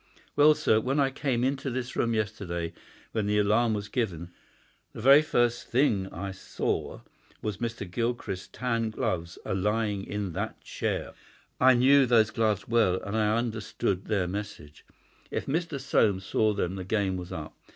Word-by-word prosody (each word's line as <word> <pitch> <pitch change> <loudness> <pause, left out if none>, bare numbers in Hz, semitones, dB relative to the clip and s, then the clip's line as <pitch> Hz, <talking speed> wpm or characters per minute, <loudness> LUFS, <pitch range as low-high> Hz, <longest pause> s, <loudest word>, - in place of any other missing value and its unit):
Well, 150 +1 +6
sir, 110 - +3
when 135 +5 0
I 135 -1 +3
came 130 -3 -1
into 135 +1 -1
this 125 0 -4
room 115 -1 +1
yesterday 95 -6 -3 0.4
when 110 -2 -1
the 105 0 +2
alarm 110 +2 +3
was 105 0 -4
given, 90 -9 -3 0.6
the - - -7
very 135 +5 +8
first 120 -5 +1
thing 110 -7 +1
I 95 +3 -5
saw 95 - -3 0.4
was 105 -2 -3
Mr. 115 -4 -4
Gilchrist's 110 -1 -3
tan 115 -3 -1
gloves 90 -7 -3
a - - -2
lying 105 +1 0
in 105 -2 -3
that - - -4
chair. - - -3 0.5
I 130 0 +6
knew 135 +2 +5
those 110 -2 +4
gloves 105 -3 0
well, 110 -6 +3
and 100 +2 -4
I 110 0 +2
understood 110 -5 -2
their 100 -4 0
message. 100 -6 -7 0.4
If - - -3
Mr. 160 0 -2
Soames 100 -7 +2
saw 110 +1 +1
them 95 -1 -2
the 95 - -4
game 95 -1 0
was 90 -1 -6
up. 75 -1 -6
110 Hz, 165 wpm, -28 LUFS, 95-120 Hz, 0.6 s, very